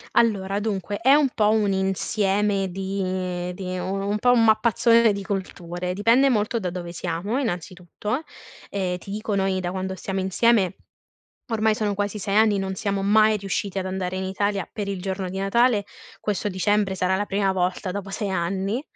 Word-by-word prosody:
Allora, 200 -4 +2
dunque 205 -2 -2
è 265 +4 +5
un 295 -2 +4
po' 210 -1 +3
un 215 -2 +2
insieme 195 +1 0
di 185 -1 -3
di 185 0 -4
u 180 - -3 0.2
un 210 +1 0
po' 245 +3 +4
un 240 -2 +4
mappazzone 225 0 +4
di 200 - -4
culture, 180 -3 -4
dipende 230 +7 +4
molto 225 -1 +1
da 185 -5 -3
dove 175 -1 -6
siamo, 175 +7 -2
innanzitutto. 185 - -3 0.5
Ehm, 185 -2 -2
ti 195 - -9
dico 210 -1 -2
noi 190 -1 +1
da 175 -1 -2
quando 190 0 -3
stiamo 195 +1 -4
insieme, 190 +1 +2 0.7
ormai 220 -1 +2
sono 210 -1 -1
quasi 205 +1 -2
6 195 0 -2
anni, 215 -2 +4
non 190 0 -2
siamo 200 0 -2
mai 215 +2 +4
riusciti 195 0 -3
ad 190 - -2
andare 185 -1 -3
in 190 - -2
Italia 195 -1 -1
per 205 -2 -4
il 195 -2 -4
giorno 190 -1 -3
di 190 - -6
Natale, 210 +2 +2 0.3
questo 210 0 -2
dicembre 200 +1 +1
sarà 185 0 +1
la 205 +2 -1
prima 195 -1 +1
volta 185 +1 -1
dopo 200 +1 -5
6 195 +1 -3
anni 190 +6 -1
195 Hz, 180 wpm, -24 LUFS, 185-210 Hz, 0.7 s, è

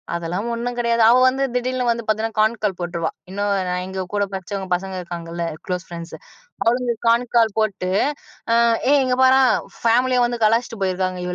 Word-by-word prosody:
"அதெல்லாம் 175 +6 -3
ஒண்ணும் 240 +1 -4
கெடையாது" 235 -1 +2
அவ 245 - +6
வந்து 265 +1 -2
திடீர்ன்னு 250 0 0
வந்து 230 -1 -3
பாத்தீங்கன்னா, 220 0 -1
கான் 220 +2 +2
கால் 190 -3 -1
போட்ருவா. 170 -1 -2 0.2
இன்னும் 205 +1 -1 0.2
நான் 180 0 -2
எங்க 190 -1 -4
கூட 205 0 +1
படிச்சவங்க 190 0 -5
பசங்க 190 +2 -5
இருக்காங்கல்ல, 170 -1 -5 0.2
குளோஸ் 180 0 -3
ஃபிரெண்ட்ஸு, 170 0 -8 0.5
அவளுங்களுக்கு 240 0 0
கான் 240 +1 +2
கால் 225 -3 +3
போட்டு, 190 -4 -1 0.6
அ - - +4 0.4
"ஏய் 285 - +5
இங்கே 250 0 0
பாரேன்! 260 0 +5 0.4
பேமிலியே 250 +2 +3
வந்து 240 -1 -4
கலாய்ச்சுட்டு 230 -1 0
போயிருக்காங்க 185 -1 -1
215 Hz, 170 wpm, -21 LUFS, 185-240 Hz, 0.6 s, அவ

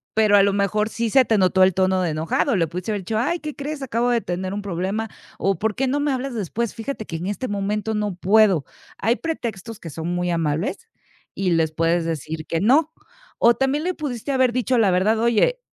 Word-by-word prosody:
pero 215 -2 +4
a - - +7
lo 200 - +3
mejor 205 +2 0
sí 230 0 -2
se 265 -2 +5
te 220 -2 +2
notó 190 0 +3
el 185 -1 +4
tono 190 0 +2
de 175 - 0
enojado. 155 +6 0
Le 170 - +2
pudiste 180 +5 -6
haber 205 -2 -2
dicho: 215 +4 -2
"Ay, 340 +8 0
¿qué 300 -2 -6
crees? 285 0 -5
Acabo 240 -1 0
de 235 -2 +2
tener 185 +1 -3
un 205 - -3
problema 195 +4 -2 0.3
o 195 -3 0
por 220 -1 -1
qué 270 - 0
no 285 +3 0
me 290 -1 0
hablas 260 0 -3
después. 225 +2 -3
Fíjate 225 -1 -5
que 165 - -5
en 175 - -5
este 210 +6 -3
momento 205 +2 -2
no 210 -3 -2
puedo". 190 -4 +3 0.3
Hay 230 +4 +1
pretextos 230 - -5
que 165 - -8
son 160 +3 -5
muy 175 0 -1
amables 165 - -2 0.5
y 190 -2 0
les 160 -2 +2
puedes 165 +1 +1
decir 160 0 -4
que 165 - -1
no. 290 +9 +4 0.5
O 235 - +5
también 270 +5 0
le 365 +1 -1
pudiste 280 -4 -4
haber 260 -2 +2
dicho 250 +1 +1
la 210 -3 +4
verdad: 210 +5 +2
"Oye, 235 - +2
210 Hz, 225 wpm, -22 LUFS, 180-245 Hz, 0.5 s, a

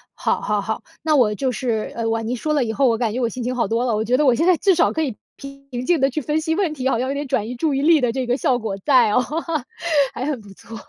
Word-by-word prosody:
好 - - -1
好 210 -1 0
好， 220 +2 -3 0.2
那 310 -1 +2
我 215 -6 +3
就 265 +1 -1
是 230 -3 -2
呃， 230 -1 -2
哇， 225 0 -1
您 240 +3 -2
说 305 +5 -1
了 280 - +2
以 220 - -3
后， 270 0 +3
我 225 - +1
感 225 -3 -1
觉 250 - -2
我 235 - +1
心 245 +1 -6
情 250 +1 -2
好 235 - 0
多 230 +4 0
了， 230 -3 +1
我 215 - 0
觉 245 +3 +1
得 300 - +2
我 255 - +5
现 325 +8 +1
在 360 -3 +5
至 390 -2 +3
少 - - +3
可 320 - -1
以 260 -8 -3 0.2
平 275 -3 -8
静 335 -3 +2
地 270 - +4
去 305 +4 -3
分 300 +4 -1
析 320 0 -1
问 350 -6 0
题， 265 -2 -1
好 235 - +1
像 260 - -1
有 - - -1
点 285 0 -4
转 220 -4 -1
移 245 - -5
注 280 +3 -1
意 275 - -1
力 320 -2 +5
的 245 -2 +1
这 260 +1 -2
个 245 +1 +1
效 255 -2 +1
果 220 -4 -4
在 250 -7 +4
哦， 250 - +3 0.9
还 255 - -3
很 285 -5 -3
不 205 -1 -14
错， 225 - -12
255 Hz, 335 characters per minute, -21 LUFS, 230-290 Hz, 0.9 s, 我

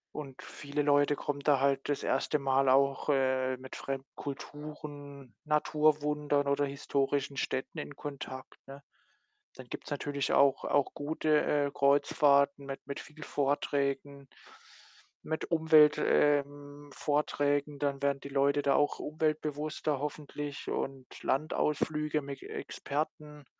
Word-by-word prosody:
und 135 -3 -7
viele 145 0 -4
Leute 145 0 +3
kommen 145 -1 -3
da 140 -1 +3
halt 135 0 +1
das 145 - 0
1. 140 +3 0
Mal 135 0 +2
auch, 140 +2 +3
äh, 130 -2 +2
mit 130 +1 -10
fremden 135 0 -5
Kulturen, 145 -1 -8
Naturwundern 150 -1 +1
oder 140 +1 +2
historischen 140 0 -1
Städten 130 -1 -3
in 145 - -7
Kontakt, 135 -2 -7
ne? 135 +1 -11 0.7
Dann 130 - -11
gibt's - - -8
natürlich 140 -1 -2
auch 140 -1 +4
auch 145 -2 +1
gute, 150 +1 +1 0.2
äh, 140 - -3
Kreuzfahrten 140 0 +3
mit 135 0 -5
mit 140 - -5
viel 150 0 -12
Vorträgen, 140 -1 -1 0.9
mit 160 +2 -4
Umwelt 155 -2 +6
ähm, 145 0 +1
Vorträgen. 145 0 0
Dann 140 -1 -1
werden 140 -1 +1
die 140 - -8
Leute 140 +1 +2
da 140 -1 +2
auch 145 - +2
umweltbewusster 155 -1 -1
hoffentlich 145 0 -5
und 135 -2 -3 0.2
Landausflüge 150 +1 0
mit 140 -1 -7
Experten. 150 0 -5
145 Hz, 125 wpm, -31 LUFS, 140-150 Hz, 0.9 s, Umwelt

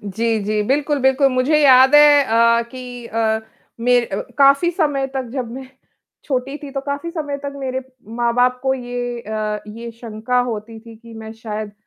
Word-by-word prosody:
जी, 220 +3 -1
जी। 210 0 0
बिल्कुल, 290 +2 +1
बिल्कुल। 265 +1 +3
मुझे 255 +5 +2
याद 265 0 +6
है 295 -1 +7
अ, 230 0 +3
कि 245 0 -9
अ, 220 -1 0 0.4
मेर 245 0 +2 0.3
काफ़ी 280 +4 +5
समय 290 -6 0
तक 260 -2 -3
जब 255 -4 -4
मैं 260 +1 -8 0.6
छोटी 270 +1 -2
थी, 290 -2 -9
तो 275 0 -3
काफ़ी 285 +4 -4
समय 300 -4 -4
तक 280 0 -5
मेरे 260 -1 -3 0.4
माँ-बाप 245 +1 +1
को 265 0 +1
ये 245 -1 -5
अ, 215 -1 -3
ये 230 +2 -8
शंका 230 +1 -3
होती 220 +1 -7
थी 230 0 -14
कि 230 0 -14
मैं 220 0 -8
शायद 215 -2 -6
245 Hz, 170 wpm, -19 LUFS, 225-275 Hz, 0.6 s, है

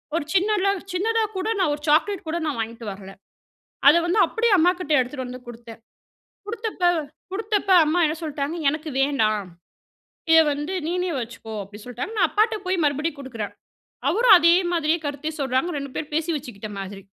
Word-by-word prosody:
ஒரு 335 - 0
சின்னதா 395 +1 +2 0.2
சின்னதா 445 +5 +1
கூட 375 +4 -2
நான் 345 -6 +2
ஒரு 295 - -14
சாக்லேட் 340 +4 +2
கூட 325 +2 -1
நான் 290 -7 -2
வாங்கிட்டு 230 +1 -6
வரல. 195 0 -10 0.8
அத 290 - +8
வந்து 350 +5 +1
அப்படியே 460 -1 0
அம்மாகிட்ட 350 -1 +2
எடுத்துட்டு 255 +1 -4
வந்து 250 +1 -8
குடுத்தேன். 230 -1 -11 0.7
குடுத்தப்ப 440 -4 -4 0.5
குடுத்தப்ப 415 -1 -1
அம்மா 315 +4 +1
என்ன 310 +1 -2
சொல்லிட்டாங்க, 295 +1 -3
எனக்கு 310 +1 -5
வேண்டாம். 215 -9 +1 0.8
இத 325 - +8
வந்து 295 +5 -4
நீயே 360 +1 -1
வச்சுக்கோ 225 -1 -8
அப்படின்னு 205 +2 -12
சொல்லிட்டாங்க. 250 - -5
நான் - - +4
அப்பாட்ட 435 +1 +2
போய் 365 -2 0
மறுபடியும் 295 +2 -1
குடுக்கிறேன். 230 -6 -6 0.6
அவரும் 440 0 +7
அதே 335 0 +5 0.2
மாதிரியே 330 0 +1
கருத்தை 290 +2 -3
சொல்றாங்க. 265 +5 0
2 280 -1 -6
பேரும் 300 -1 -5
பேசி 320 +2 0
வச்சுக்கிட்ட 230 -7 -8
மாதிரி. 195 0 -7
305 Hz, 160 wpm, -23 LUFS, 250-365 Hz, 0.8 s, அத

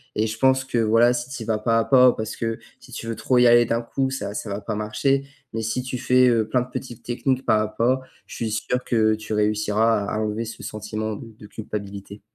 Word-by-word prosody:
et 110 - +1
je 110 0 -4
pense 130 0 +3
que 130 -2 -3
voilà, 115 +2 +4
si 120 +1 -3
tu 135 -4 -6
y - - -9
vas 110 -1 0
pas 115 +1 +1
à - - +2
pas, 125 -2 +6
parce 110 0 -5
que 115 -1 -2 0.2
si - - -16
tu 115 - -6
veux 115 - -3
trop 125 - +1
y 125 - +6
aller 120 0 +6
d'un 115 +1 0
coup, 135 +3 -2
ça 115 -7 -4
ça 105 - -5
va 100 +1 -4
pas 105 - -4
marcher. 135 +6 0 0.2
Mais 115 0 -3
si 110 +3 -2
tu 130 0 -4
fais, 125 0 +4
heu, 115 -3 +2
plein 125 +3 +1
de 125 - -6
petites 120 -2 -7
techniques 130 +2 -1
pas 110 -2 +4
à 110 - 0
pas, 115 +5 +1 0.3
je - - -11
suis 115 -2 -3
sûr 125 +3 -1
que 110 -2 +2
tu 110 0 -6
réussiras 105 +1 +2
à - - -4
à - - -1
enlever 110 +1 -2
ce 115 - -9
sentiment 110 0 -4
de 115 - -10
de - - -13
culpabilité. 100 -1 -7
115 Hz, 260 wpm, -23 LUFS, 110-125 Hz, 0.3 s, pas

